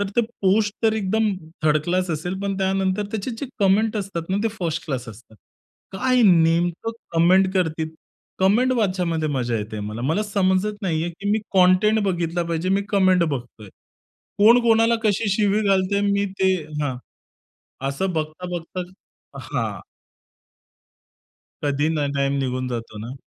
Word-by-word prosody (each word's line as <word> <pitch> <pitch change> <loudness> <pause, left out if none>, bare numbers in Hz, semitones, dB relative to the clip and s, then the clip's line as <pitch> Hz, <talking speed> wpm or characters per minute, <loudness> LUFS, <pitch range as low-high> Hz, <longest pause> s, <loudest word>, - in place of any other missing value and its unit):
तर 205 - -1
ते - - +6 0.2
पोस्ट 205 +2 +2
तर 220 - +4
एकदम 215 0 +1 0.3
थर्ड 155 0 +3
क्लास 180 0 0
असेल, 165 +4 -3
पण 195 -1 -2
त्यानंतर 190 +1 0
त्याचे 220 +3 -3
जे 280 - -3
कमेंट 210 +3 +3
असतात 190 -4 -4
ना, 190 - +1
ते 225 - +2
फर्स्ट 170 -2 -2
क्लास 130 -5 -4
असतात. 110 0 -13 0.6
काय 250 +5 +2
नेमकं 170 +2 +3 0.3
कमेंट 185 +3 +4
करती 160 -4 0 0.5
कमेंट 230 +7 +3
वाचयामध्ये 180 -8 0
मजा 125 -5 -1
येते 105 0 -5
मला. 105 +3 -5
मला 160 +10 +1
समजत 200 0 0
नाहीये, 170 -2 -1
की 200 +4 -4
मी 215 - +3 0.2
कंटेंट 185 +4 +4
बघितला 175 -2 -1
पाहिजे, 170 +1 -2
मी 195 +1 +2
कमेंट 185 -3 +4
बघतोय. 125 -8 -5 0.7
कोण 230 +4 +7
कोणाला 230 0 +4
कशी 215 +1 +1
शिवी 205 +1 +2
घालतय, 195 +1 +2
मी 200 0 +1 0.2
ते 190 0 +4 0.3
हां. 130 -3 -2 0.9
असं 185 +7 -2
बघता-बघताच 175 +3 -5 0.5
हां. - - -3 1.8
कधी 145 +1 +1
ना 150 -3 0
टाईम 140 0 0
निघून 130 -1 -2
जातो 115 -3 -6
ना. 115 +4 -6
185 Hz, 145 wpm, -22 LUFS, 155-200 Hz, 1.8 s, कोण